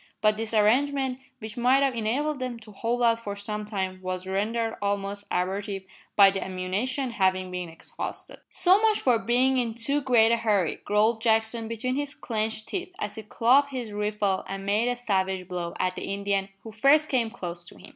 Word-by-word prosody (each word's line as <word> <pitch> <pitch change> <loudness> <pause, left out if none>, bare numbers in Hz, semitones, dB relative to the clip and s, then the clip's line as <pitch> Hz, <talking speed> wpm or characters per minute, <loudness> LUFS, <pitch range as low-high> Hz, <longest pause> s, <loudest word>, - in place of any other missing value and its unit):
But 215 0 +3
this 225 0 -4
arrangement, 260 +4 +2 0.2
which 220 -3 -8
might 255 +3 +4
have 270 -2 +2
enabled 265 +6 -1
them 255 -2 -3
to 215 - -13
hold 235 +4 -1
out 230 -1 +4
for 205 -3 -5
some 210 +1 -4
time, 190 -3 -3
was 185 0 -4
rendered 225 +4 -1
almost 200 0 -2
abortive 195 +2 -2 0.3
by 200 -1 +8
the 195 -1 -3
ammunition 205 +9 -2
having 185 -3 +1
been 180 -1 -4
exhausted. 165 - -7
"So 375 +3 +4
much 440 -1 +3
for 245 -3 +3
bein' 250 +3 +2
in 230 -2 -2
too 280 +5 0
great 235 -4 +4
a 235 - +4
hurry!" 205 -7 +1
growled 215 +2 +2
Jackson 225 0 +1
between 240 +3 -2
his 290 0 -3
clenched 220 -1 -3
teeth, 370 -1 -4
as 430 - -4
he 220 - -6
clubbed 250 +6 +3
his 250 -5 -5
rifle 210 -2 0
and 195 +1 -5
made 210 +4 +2
a 245 - +1
savage 190 -6 -1
blow 175 -2 -4
at 185 0 0
the - - -5
Indian 200 -1 -1
who 225 - -8
first 280 +8 +4
came 245 -6 +1
close 175 -6 -6
to - - -14
him. - - -13
220 Hz, 195 wpm, -26 LUFS, 195-245 Hz, 0.3 s, by